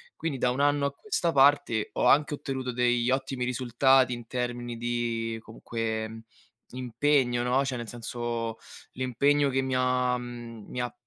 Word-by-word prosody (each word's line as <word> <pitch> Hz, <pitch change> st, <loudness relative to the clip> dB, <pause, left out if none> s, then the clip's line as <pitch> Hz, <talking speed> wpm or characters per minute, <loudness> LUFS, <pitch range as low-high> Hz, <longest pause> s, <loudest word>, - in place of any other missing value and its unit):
Quindi 160 Hz, -4 st, -3 dB
da 125 Hz, -1 st, +1 dB
un 125 Hz, -, -3 dB
anno 145 Hz, 0 st, +3 dB
a 140 Hz, -, 0 dB
questa 175 Hz, 0 st, -1 dB
parte 135 Hz, -6 st, +4 dB
ho -, -, 0 dB
anche 150 Hz, +1 st, +4 dB
ottenuto 130 Hz, -3 st, -4 dB
degli 120 Hz, 0 st, +1 dB
ottimi 130 Hz, -1 st, -1 dB
risultati 125 Hz, +1 st, +3 dB
in 120 Hz, -1 st, -7 dB
termini 120 Hz, -1 st, -3 dB
di 115 Hz, -1 st, -2 dB
comunque 110 Hz, 0 st, -4 dB, 0.5 s
impegno, 125 Hz, 0 st, +1 dB
no? 125 Hz, +3 st, +2 dB
Cioè 130 Hz, -3 st, -3 dB
nel 120 Hz, -, -6 dB
senso 115 Hz, 0 st, -4 dB, 0.4 s
l'impegno 140 Hz, +3 st, +2 dB
che 135 Hz, 0 st, +1 dB
mi 130 Hz, -1 st, -1 dB
ha, 125 Hz, 0 st, +2 dB
mhmm, 120 Hz, -3 st, -8 dB
mi 125 Hz, -, -5 dB
ha, 125 Hz, -, -3 dB
125 Hz, 155 wpm, -28 LUFS, 120-135 Hz, 0.5 s, parte